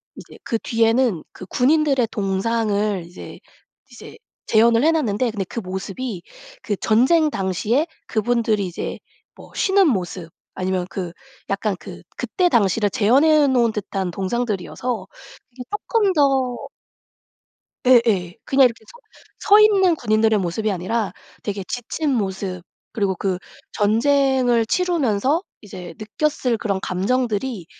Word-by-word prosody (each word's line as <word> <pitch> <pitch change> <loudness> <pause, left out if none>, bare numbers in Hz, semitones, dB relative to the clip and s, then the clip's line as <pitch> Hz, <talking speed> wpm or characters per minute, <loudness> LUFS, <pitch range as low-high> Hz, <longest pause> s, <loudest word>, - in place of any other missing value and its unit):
이제 - - -13
그 230 - -1
뒤에는 230 -5 +1
그 185 - -10
군인들의 275 -1 +2
동상을 205 -1 -1
이제 175 +2 -11 0.5
이제 - - -12 0.3
재현을 230 +2 +4
해 325 - +5
놨는데 245 -7 0
근데 200 -3 -3
그 230 - -5
모습이 190 +2 -5 0.4
그 210 - -2
전쟁 285 +9 +3
당시에 205 - 0 0.2
그분들이 220 -3 0
이제 175 - -5 0.4
뭐 - - -15
쉬는 385 -2 +3
모습 180 - -2 0.2
아니면 185 -1 -2
그 180 -3 -5 0.4
약간 200 +1 -1
그 - - -10
그때 365 -3 0
당시를 210 - +2
재현해 285 +9 +4
놓은 240 -4 +2
듯한 195 -3 -3
동상들이어서 210 +1 -3 0.4
이게 250 +1 -9
쪼끔 415 -1 +1
더 270 -5 +2 1.3
예예. 225 -8 +4
그냥 270 0 +4
이렇게 230 -2 -4
서 475 - -16 0.4
서 420 0 +6
있는 390 -4 +5
군인들의 220 -5 +2
모습이 200 +5 -2
아니라 200 +4 -2 0.3
되게 200 -2 -3
지친 270 +5 -3
모습 190 -5 -3 0.3
그리고 200 -3 0
그 185 0 -2 0.3
전쟁을 245 +2 +2
치르면서 305 - +1 0.2
이제 180 -5 -10
느꼈을 245 +2 -1
그런 200 -4 -2
감정들이 215 +1 -1
225 Hz, 275 characters per minute, -21 LUFS, 195-265 Hz, 1.3 s, 서